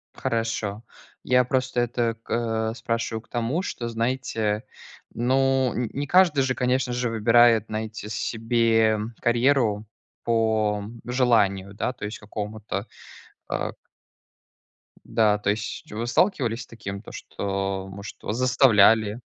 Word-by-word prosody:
Хорошо. 115 -3 -2 0.4
Я 125 0 +4
просто 130 -1 0
это 120 -1 0
к - - -13 0.4
э, - - -6
спрашиваю 115 -1 -2
к - - -28
тому, 120 +8 -1
что, 120 -10 -4
знаете, 115 -2 -1 0.5
ну, 130 +1 +2
н 120 -2 -1
не 145 +1 -3
каждый 175 -5 +5
же, 130 -1 0
конечно 125 0 0
же, 125 0 -1
выбирает 115 0 +5
знаете 110 -1 -5
себе, 115 0 +2
м, 110 +2 -4
карьеру 120 -3 +2 0.4
по 110 -3 +1 0.2
желанию, 110 -6 +2
да, 115 +5 -2
то 110 -4 -7
есть, 105 - -5
какому-то, 105 0 -5 0.6
а, - - -2
к - - -36 1.2
Да, 105 -2 +2
то 105 - -1
есть, 105 0 -3
вы 115 +3 -3
сталкивались 120 - +1
с - - -18
таким, 100 -3 -7
то - - -12
что, 95 -1 -3
может, 100 +2 -9
вас 105 - -3
заставляли? 115 -4 +4
115 Hz, 135 wpm, -25 LUFS, 105-125 Hz, 1.2 s, каждый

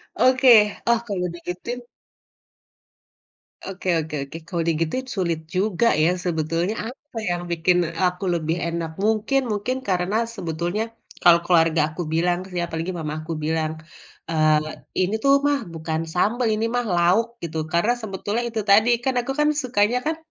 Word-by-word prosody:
Oke, 250 -5 +5
oh 235 -1 +4
kalau 185 -3 -2
digituin 180 +8 -5 1.8
oke 190 -1 -5
oke 155 -1 -4
oke, 160 - -8
kalau 175 - -3
digituin 165 +11 -1
sulit 170 -5 0
juga 195 +5 +1
ya 155 +3 +3
sebetulnya 165 +4 -1 0.2
apa 285 -1 -14
yang 175 0 -1
bikin 170 +2 +2 0.2
aku 180 +2 0
lebih 160 0 -1
enak. 170 -1 -3
Mungkin 220 +6 +2
mungkin 210 +5 -1
karena 190 +5 +1
sebetulnya 175 +2 -2 0.4
kalau 170 -1 +7
keluarga 165 -2 +4
aku 180 - -3
bilang, 175 +3 0
ya, 175 -1 -2
apalagi 165 +2 -3
mamah 155 -3 -4
aku 165 +1 -4
bilang, 155 0 -1 0.6
eee, 155 -1 +1 0.2
"Ini 205 - -1
tuh 275 - +5
mah 290 -1 +2
bukan 160 0 -3
sambal, 230 +7 +1
ini 215 +1 0
mah 245 - +1
lauk," 215 +5 +1
gitu. 160 -2 -3
Karena 175 +8 +2
sebetulnya 220 0 -3
itu 225 -1 -3
tadi, 210 +4 +6
kan 260 +2 -1
aku 255 +3 -4
kan 300 - +4
sukanya 245 -5 +1
kan 315 +2 0
180 Hz, 150 wpm, -23 LUFS, 165-225 Hz, 1.8 s, kalau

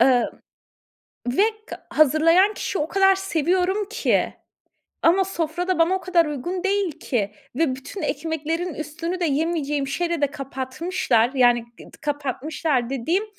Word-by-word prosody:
Emm 245 0 +5 1.1
ve 255 +11 +3 0.2
k - - -10
hazırlayan 330 +7 +4
kişi 395 - -3
o 300 - 0
kadar 385 0 +4
seviyorum 375 +2 0
ki, - - +1 0.7
ama 370 +3 +4
sofra 345 -1 -3
da 370 -2 +1
bana 335 +3 +4
o 380 - -1
kadar 345 -3 +2
uygun 345 +6 -4
değil 390 -3 +1
ki, 210 -5 -1 0.2
ve 285 -5 +2
bütün 275 +9 -8
ekmeklerin 320 +3 -2
üstünü 330 +4 -4
de, - - +1
yemeyeceğim 295 -2 0
şeyle 340 +3 -1
de 285 - +4
kapatmışlar, 265 -2 -1
yani 245 -2 +5 0.2
ı - - -12
kapatmışlar 285 -2 -1
dediğim 325 - 0
320 Hz, 140 wpm, -23 LUFS, 275-360 Hz, 1.1 s, Emm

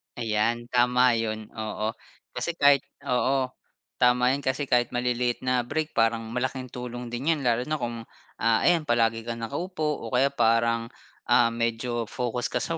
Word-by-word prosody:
Ayan, 115 +1 -1
tama 125 0 +4
'yun, 110 -1 -3
oo. 110 0 -3 0.4
Kasi 170 - -3
kahit 140 -3 +4 0.2
oo. 130 0 +1 0.5
Tama 125 0 +4
'yan, 140 +1 -2
kasi 130 +1 -1
kahit 120 -1 +2
maliliit 120 0 0
na 125 -1 +1
break 155 +4 -2
parang 115 0 +1
malaking 130 +1 -3
tulong 125 -1 -6
din 130 +8 0
'yan 155 - -4
lalo 120 0 +1
na 155 -1 -2
kung, 115 -1 -4 0.3
ah, 115 0 +3
ayan 170 -3 +3
palagi 115 -3 +1
ka 120 - -3
nakaupo 150 - -3
o - - -8
kaya 130 +3 +4
parang, 115 -2 +2 0.4
ah, 115 - +5
medyo 115 0 -2
focus 120 +2 -3
ka - - -2
sa 165 -1 -2
125 Hz, 165 wpm, -26 LUFS, 115-130 Hz, 0.5 s, ah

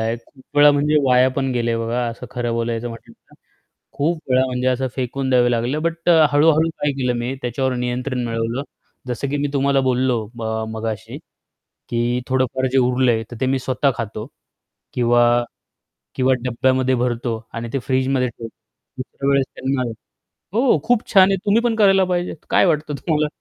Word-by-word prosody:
आहे. 115 +1 -1
खूप 130 +4 -20
वेळा 145 0 +8
म्हणजे 145 +1 +2
वाया 125 0 +5
पण 135 -1 0
गेले 120 -1 0
आहे 115 - -1
बघा. 120 +2 -1
असं 115 +2 -8
खरं 120 -2 -2
बोलायचं 115 0 -2
म्हटलं 115 -1 -11
तर. - - -25 0.6
खूप 160 +3 -1
वेळा 130 0 +3
म्हणजे 125 0 -2
असं 130 +1 +1
फेकून 130 +1 -2
द्यावं 125 -1 +4
लागलं 120 +5 -1
बट 165 +1 -1
अ, 160 -2 +6
हळू-हळू 155 +2 +4
काय 145 -3 -2
केलं 125 -2 -1
मी, 120 +2 -3
त्याच्यावर 130 +2 -1
नियंत्रण 125 +1 -2
मिळवलं. 115 +3 -2 0.4
जसं 125 +3 -3
की 145 - -1
मी 145 0 0
तुम्हाला 140 0 +2
बोललो 125 -3 +1
ब 115 - -7 0.3
मगाशी 110 -1 -5 0.7
की 120 +1 0
थोडंफार 130 0 0
जे 135 - +2
उरलंय 125 -2 +2
तर 120 - -8
ते - - +2
मी 130 +1 +1
स्वतः 130 +2 0
खातो 110 -1 -5 0.7
किंवा 120 -1 +3 0.9
किंवा 130 0 +2
डब्यामध्ये 130 +1 +1
भरतो 120 -1 -1 0.2
आणि 115 0 -4
ते 135 - 0
फ्रीजमध्ये 130 -1 +1
ठेवतो 115 -1 -9 0.5
दुसऱ्या 135 +2 -4
वेळेस 140 -1 +3
त्यांना 130 0 -1 0.7
हो 245 +4 +3
खूप 240 -1 +2
छान 190 -1 +7
आहे 195 - +1
तुम्ही 210 +3 +3
पण 235 -2 +1
करायला 195 -3 +4
पाहिजेत. 180 -1 -2
काय - - +4
वाटतं 150 -3 0
तुम्हाला? 150 +2 0
130 Hz, 175 wpm, -20 LUFS, 120-145 Hz, 0.9 s, वेळा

